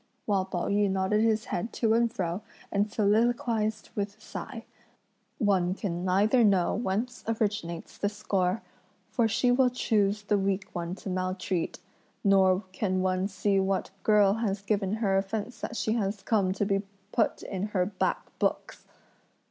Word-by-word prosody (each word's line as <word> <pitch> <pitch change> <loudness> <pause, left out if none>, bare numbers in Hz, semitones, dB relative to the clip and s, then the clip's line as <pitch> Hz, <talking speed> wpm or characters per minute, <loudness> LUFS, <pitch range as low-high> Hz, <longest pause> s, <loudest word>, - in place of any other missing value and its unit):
while 195 -3 +1
Pao 180 -2 -3
yü 205 0 +2
nodded 190 +2 +1
his 220 -1 +2
head 200 +7 -3
to 225 -2 +2
and 230 0 +3
fro 185 -4 -2 0.3
and 205 +1 +1
soliloquised 220 0 +1
with 205 0 -3
a - - -31
sigh: 230 +2 -7 0.7
"One 190 -5 +2
can 180 -4 -3
neither 205 +7 +3
know 195 -5 +3
whence 230 +3 -2
originates 210 -7 -2
this 205 0 -1
score; 185 +1 0 0.5
for 235 -2 +2
she 235 +3 +2
will 250 0 +4
choose 210 -4 +1
the 205 0 +1
weak 195 0 0
one 175 0 -3
to 195 - -7
maltreat; 185 -1 -2 0.5
nor 190 -1 +4
can 185 -1 0
one 185 0 +1
see 195 0 +1
what 190 0 0
girl 205 -2 +5
has 205 -3 -2
given 200 -1 0
her 200 -3 +2
offence 210 +4 -4
that 235 - -4
she 220 - 0
has 205 -3 -1
come 200 -5 +2
to 200 +1 -1
be 195 -1 +1 0.3
put 225 - +1
in 195 +1 -3
her 185 -4 +1
black 195 0 -1
books!" - - -2
200 Hz, 160 wpm, -28 LUFS, 190-220 Hz, 0.7 s, girl